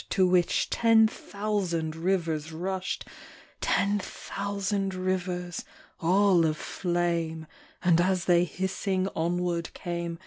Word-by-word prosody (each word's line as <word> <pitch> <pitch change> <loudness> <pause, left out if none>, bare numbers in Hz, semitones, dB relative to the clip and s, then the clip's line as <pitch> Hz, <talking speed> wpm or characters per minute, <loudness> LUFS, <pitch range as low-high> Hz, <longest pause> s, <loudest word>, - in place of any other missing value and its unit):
To 190 - +3
which 180 -1 +2
ten 225 -1 +5
thousand 195 -8 -2
rivers 165 -3 -1
rushed, 185 +3 -3 0.3
— - - -25
Ten 205 +1 +2
thousand 200 0 -3
rivers, 180 -1 -2 0.4
all 185 +1 +4
of 155 -1 +1
flame, 170 -3 -1 0.2
— - - -27
And 175 -1 +5
as 185 -1 +1
they 175 -1 +5
hissing 190 +2 -1
onward 170 0 -1
came. 170 -1 -4
180 Hz, 115 wpm, -28 LUFS, 170-195 Hz, 0.4 s, ten